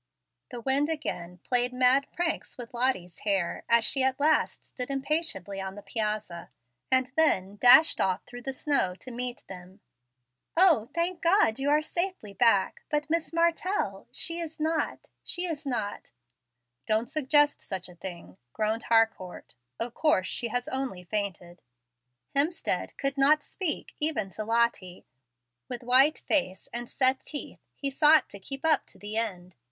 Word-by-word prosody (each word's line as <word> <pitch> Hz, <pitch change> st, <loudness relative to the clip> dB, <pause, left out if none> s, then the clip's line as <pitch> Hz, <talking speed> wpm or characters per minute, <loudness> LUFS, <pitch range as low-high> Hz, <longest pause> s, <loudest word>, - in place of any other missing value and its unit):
The 240 Hz, -, -7 dB
wind 275 Hz, +4 st, +1 dB
again 180 Hz, -, -4 dB
played 245 Hz, 0 st, +2 dB
mad 255 Hz, +2 st, +3 dB
pranks 345 Hz, -1 st, -3 dB
with 245 Hz, -1 st, -9 dB
Lottie's 235 Hz, -9 st, -1 dB
hair 195 Hz, -4 st, -1 dB
as 235 Hz, -1 st, +4 dB
she 270 Hz, -, +1 dB
at 265 Hz, +1 st, +1 dB
last 305 Hz, +2 st, +1 dB
stood 250 Hz, 0 st, -6 dB
impatiently 270 Hz, -, -1 dB
on 190 Hz, 0 st, -6 dB
the 205 Hz, -, -10 dB
piazza, 210 Hz, -4 st, -3 dB, 0.4 s
and 260 Hz, -1 st, +3 dB
then 205 Hz, -11 st, +2 dB
dashed 250 Hz, +8 st, +7 dB
off 190 Hz, 0 st, 0 dB
through 245 Hz, 0 st, -10 dB
the 270 Hz, -, -4 dB
snow 265 Hz, -, 0 dB
to 255 Hz, -, -9 dB
meet 245 Hz, 0 st, -4 dB
them. 185 Hz, +1 st, -11 dB, 0.8 s
"O, 325 Hz, -, +5 dB
thank 340 Hz, +1 st, -1 dB
God, 335 Hz, -, +3 dB
you 275 Hz, +1 st, 0 dB
are 300 Hz, +1 st, +3 dB
safely 345 Hz, -, -3 dB
back. 200 Hz, -3 st, +2 dB
But 300 Hz, +1 st, -1 dB
Miss 330 Hz, -1 st, 0 dB
Martell 340 Hz, +4 st, 0 dB
she 335 Hz, 0 st, -2 dB
is 320 Hz, -2 st, -6 dB
not 315 Hz, +1 st, -1 dB, 0.2 s
she 355 Hz, +1 st, -3 dB
is 315 Hz, -4 st, -5 dB
not 215 Hz, -6 st, -3 dB, 0.4 s
" 120 Hz, 0 st, -54 dB
"Don't 220 Hz, +2 st, +1 dB
suggest 295 Hz, +1 st, +3 dB
such 190 Hz, -2 st, -5 dB
a 180 Hz, -, -13 dB
thing," 170 Hz, -, -9 dB, 0.2 s
groaned 220 Hz, +1 st, -1 dB
Harcourt. 225 Hz, -, 0 dB, 0.3 s
"Of 235 Hz, 0 st, -3 dB
course 245 Hz, -13 st, +2 dB
she 240 Hz, -, -3 dB
has 245 Hz, +2 st, -3 dB
only 260 Hz, -9 st, -4 dB
fainted." 180 Hz, -3 st, -4 dB, 0.7 s
Hemstead 305 Hz, +5 st, 0 dB
could 275 Hz, 0 st, -1 dB
not 295 Hz, +2 st, +4 dB
speak, 360 Hz, -6 st, -4 dB
even 295 Hz, -11 st, -1 dB
to 215 Hz, +5 st, -5 dB
Lottie. 225 Hz, -5 st, 0 dB, 0.6 s
With 245 Hz, -1 st, -5 dB
white 260 Hz, +5 st, +5 dB
face 190 Hz, -11 st, 0 dB
and 240 Hz, 0 st, -5 dB
set 260 Hz, 0 st, +2 dB
teeth 295 Hz, -, -6 dB, 0.2 s
he 280 Hz, -1 st, -3 dB
sought 305 Hz, +2 st, +4 dB
to 200 Hz, -, -9 dB
keep 275 Hz, +9 st, -7 dB
up 320 Hz, -, +2 dB
to -, -, -14 dB
the 210 Hz, +1 st, -6 dB
end. 185 Hz, -5 st, -3 dB
245 Hz, 160 wpm, -28 LUFS, 200-300 Hz, 0.8 s, dashed